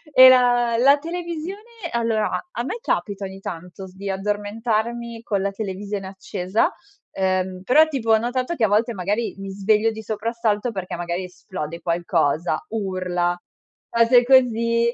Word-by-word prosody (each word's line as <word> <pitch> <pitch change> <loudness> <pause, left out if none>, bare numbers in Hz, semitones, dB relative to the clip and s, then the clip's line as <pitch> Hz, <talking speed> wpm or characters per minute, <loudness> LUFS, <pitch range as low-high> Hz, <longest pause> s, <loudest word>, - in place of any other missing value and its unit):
E 255 0 +11
la 245 -2 +4
la 275 +4 +5
televisione, 340 +3 -5 0.3
allora 225 -3 0
a - - -3
a 240 - -3
me 275 - -4
capita 200 - -2
ogni 190 0 -8
tanto 180 +1 -7
s 185 - -17
di 200 +1 -6
addormentarmi 220 +4 -2
con 200 -4 -1
la 200 - 0
televisione 200 0 -5
accesa, 190 +1 -1 0.4
ehm, 185 -1 -1
però, 310 +9 +5
tipo, 260 -7 -1
ho 220 - +7
notato 255 +6 -2
che 230 - -1
a - - +2
volte, 220 +4 +2
magari, 205 +4 -2
mi 195 0 -6
sveglio 210 +3 +2
di 220 0 -8
soprassalto 220 +1 -1
perché, 190 -4 -5
magari, 175 +1 -3
esplode 180 -3 -7
qualcosa, 170 - 0
urla, 185 -4 -1 0.5
cose 235 +1 +5
così. 235 -2 +3
215 Hz, 155 wpm, -22 LUFS, 190-235 Hz, 0.5 s, E